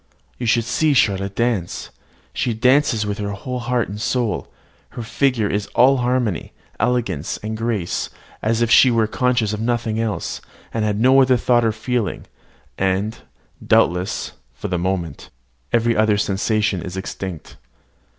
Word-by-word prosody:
You 120 - -2
should 115 +1 +3
see 145 +5 +1
Charlotte 100 -4 +1
dance. 115 -7 -1 0.4
She 120 -3 -1
dances 125 -2 +3
with 105 0 -3
her 100 0 -3
whole 125 +6 -5
heart 120 -1 0
and 105 +2 -7
soul: 120 -3 -1 0.5
her 120 - -3
figure 120 -1 +1
is 100 +1 -2
all 135 +2 +5
harmony, 120 -6 -1 0.3
elegance, 120 - 0
and 110 +1 -3
grace, 110 -6 -2 0.3
as 115 +2 +1
if 120 - 0
she 130 - +7
were 115 -2 +3
conscious 120 -1 0
of 105 - -3
nothing 115 -1 -1
else, 115 -2 -2 0.3
and 115 - 0
had 105 -1 0
no 130 +3 +6
other 130 -1 +4
thought 120 0 +3
or 115 - +2
feeling; 110 -1 -2 0.5
and, 95 +4 0 0.4
doubtless, 90 +2 +1 0.2
for 85 +10 -5
the 90 -1 -1
moment, 85 -5 -3 0.4
every 115 0 +2
other 110 -1 +3
sensation 105 -1 0
is 90 +2 -6
extinct. 95 -3 -6
110 Hz, 150 wpm, -21 LUFS, 100-120 Hz, 0.5 s, she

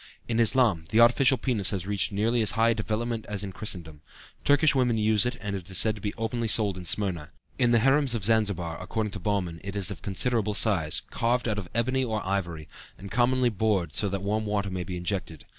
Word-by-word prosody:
In 115 -1 -1
Islam 115 -7 +3
the 110 - +2
artificial 125 +3 +5
penis 115 -5 0
has 95 -3 -2
reached 100 0 0
nearly 115 +4 +1
as 110 - +2
high 115 +1 +4
a - - +3
development 110 +1 -3
as 105 -1 -2
in 100 - -5
Christendom. 85 -8 -3 0.4
Turkish 145 +2 +4
women 125 -4 +1
use 110 0 +3
it 125 - -4
and 100 0 -4
it 95 -1 -7
is 95 - -3
said 110 +2 +3
to 105 - -11
be 105 - -2
openly 115 +1 -2
sold 105 -3 +2
in 90 -1 -9
Smyrna. 85 -4 +1 0.3
In 120 -2 +3
the 120 - +4
harems 135 +2 +2
of 105 -4 -3
Zanzibar, 100 -7 0
according 110 -2 -3
to 100 - -6
Baumann, 90 -4 -2
it 100 +1 -6
is 100 0 +1
of 100 - -8
considerable 105 +1 0
size, 90 -9 +1
carved 120 0 0
out 105 -2 -1
of 90 -4 -8
ebony 130 +3 +1
or 110 -5 -3
ivory, 85 -5 -3 0.3
and 100 0 -10
commonly 125 +2 +2
bored 100 -6 0
through 100 - 0
so - - -2
that 100 0 -4
warm 105 +2 -1
water 100 -2 -1
may 90 -1 -3
be 90 0 -6
injected. 90 -3 -4
105 Hz, 225 wpm, -26 LUFS, 95-115 Hz, 0.4 s, artificial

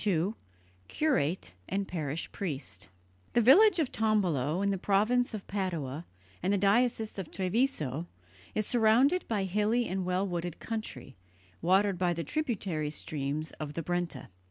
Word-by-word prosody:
II 195 0 +1 0.5
CURATE 185 - 0 0.2
AND 195 0 -1
PARISH 155 -2 -3
PRIEST 130 - -5 0.4
The 240 - +4
village 365 - +7
of 310 -6 0
Tombolo, 185 -7 +1
in 200 - +2
the 195 - -1
province 220 +6 +2
of 205 - -7
Padua 170 -7 -3 0.3
and 185 - +1
the 205 - +3
diocese 220 +2 +2
of 185 - -5
Treviso, 180 - -1 0.5
is 215 - +1
surrounded 245 - +3
by 210 -4 0
hilly 210 +5 +1
and 190 0 -2
well 185 +2 0
wooded 175 -2 -4
country, 215 - -5 0.4
watered 190 +2 +3
by 175 -1 +1
the 165 - -3
tributary 195 - -2
streams 150 0 -3
of 150 -1 -5
the 165 - -3
Brenta. 175 -6 -3
190 Hz, 145 wpm, -30 LUFS, 160-220 Hz, 0.5 s, village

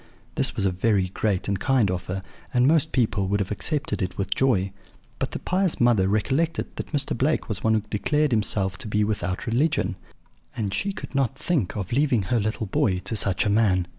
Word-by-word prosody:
This - - 0
was - - 0
a 95 - +2
very 95 0 +1
great 95 0 -1
and 100 -2 -1
kind 125 -7 +2
offer, 90 +1 -4 0.3
and 125 0 +3
most 160 +1 +3
people 110 -6 +1
would 100 +2 +1
have 100 0 -2
accepted 145 +7 -1
it 90 0 -3
with 95 -1 -1
joy; 100 -8 +1 0.5
but - - -1
the - - -5
pious 185 -1 0
mother 120 -6 +4
recollected 135 +11 0
that - - -6
Mr. 145 -2 +1
Blake 140 +6 0
was 100 -2 -4
one 110 0 +3
who 110 - +1
declared 150 +7 +1
himself 100 -3 +1
to 130 - -5
be 105 0 +1
without 95 -3 -2
religion; 135 +7 +1 0.6
and 100 -3 -2
she 200 - -1
could 195 - -8
not 135 -1 0
think 150 - -1
of 95 -3 -4
leaving 130 -5 +2
her 120 - +3
little 110 +1 -2
boy 95 -1 +1
to 105 +5 -4
such 100 +2 +3
a - - +2
man. 100 -4 +3
110 Hz, 205 wpm, -25 LUFS, 95-135 Hz, 0.6 s, mother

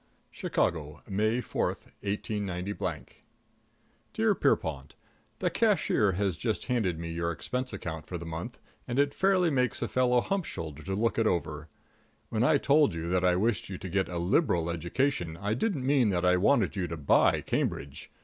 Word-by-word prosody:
| - - -38
+ - - -39
+ - - -40
II - - -5
CHICAGO, 75 -3 -1
May 110 +4 +1
4, - - -1 0.3
189 100 -2 -3 1.1
Dear - - +3
Pierrepont: 70 -3 0 0.4
The - - 0
cashier 175 - +2
has 95 -1 0
just 110 +6 -2
handed 110 -10 0
me 85 0 -5
your 85 0 -1
expense 125 - -3
account 80 -2 -6
for 90 - -4
the 85 - -8
month, 85 +9 -6 0.3
and 120 0 -3
it 140 0 +3
fairly 185 -3 +3
makes 125 -4 +1
a - - -1
fellow 125 -1 +3
hump 195 +2 -1
shouldered 80 0 -7
to 95 - -1
look 115 +3 +1
it 115 - +3
over. 80 -4 -2 0.6
When 110 0 0
I 145 +3 +5
told 140 - +3
you 85 +1 -4
that 90 0 +2
I 90 -1 +4
wished 105 +2 0
you 95 - -5
to 95 - -7
get 95 +2 0
a 90 - -4
liberal 85 - +1
education, 85 - -1
I 105 +4 -1
didn't 135 - -1
mean 135 -5 +3
that 90 -2 0
I 90 0 +5
wanted 105 +3 +3
to 90 -4 -3
buy 70 -3 +3
Cambridge. 70 0 -3
95 Hz, 185 wpm, -29 LUFS, 85-125 Hz, 1.1 s, I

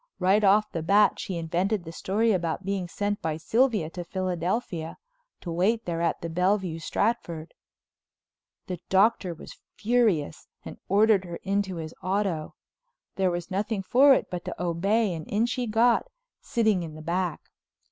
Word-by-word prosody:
Right 195 +3 +3
off 205 +2 +4
the 165 - -3
bat 200 +5 +4
she 185 - -4
invented 175 +5 -1
the 165 - -8
story 215 +6 0
about 175 -1 -1
being 195 -2 -2
sent 205 +3 -2
by 155 -1 -2
Sylvia 220 0 +1
to 175 - -6
Philadelphia—to 185 - -4
wait 205 +7 +1
there 170 -1 -2
at 170 - 0
the 170 - -3
Bellevue 180 0 0
Stratford. 170 -3 -2 1.1
The 180 -2 -5
Doctor 195 -2 +3
was - - -12 0.2
furious 210 -10 +1 0.2
and - - -9
ordered 205 0 +4
her 170 -1 -6
into 195 -1 -1
his 160 -1 -6
auto. 185 -5 -1 0.6
There 190 -1 +2
was 175 +1 -4
nothing 205 +1 -1
for 270 +7 +6
it - - -1
but 180 -1 -4
to - - -6
obey 190 +5 +1
and 160 -2 -7
in 215 +3 +1
she 245 0 -2
got, 230 - +3 0.3
sitting 220 -8 +1
in 160 -2 -7
the 155 - -10
back. 175 0 -2
190 Hz, 155 wpm, -26 LUFS, 170-215 Hz, 1.1 s, for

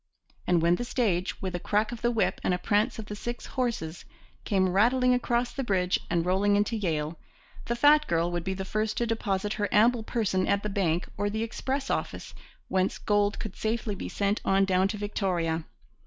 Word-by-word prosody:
And 175 -2 +3
when 170 +1 +4
the - - -3
stage, 200 -8 -1
with 185 -1 -2
a 175 - -2
crack 215 +4 0
of 240 - -7
the 240 - +2
whip 230 -3 0
and 180 - +2
a - - -2
prance 205 +4 +1
of 220 - -6
the 210 - -6
six 240 +3 -5
horses, 230 - -3 0.4
came 190 -3 +2
rattling 250 +7 +3
across 245 0 0
the 270 - -3
bridge 185 -5 +1
and 170 -1 +1
rolling 195 +3 +2
into 205 +3 +1
Yale, 160 -6 -2 0.5
the 235 - -1
fat 295 +4 +5
girl 170 +1 +1
would 175 -1 -2
be 190 +1 -2
the 190 0 -4
first 215 +2 -1
to 240 - +1
deposit 210 -2 -1
her 205 - +1
ample 230 +3 +4
person 215 -5 0
at 200 0 +1
the 210 - -2
bank 180 -4 0
or 205 - 0
the 220 +2 -2
express 265 +4 -3
office, - - -3 0.3
whence 190 0 0
gold 205 0 +1
could 215 - -6
safely 220 -1 -2
be - - -6
sent 200 +1 0
on 195 0 +3
down 190 0 +3
to 210 - -4
Victoria. 175 -6 -1
205 Hz, 205 wpm, -28 LUFS, 185-230 Hz, 0.5 s, fat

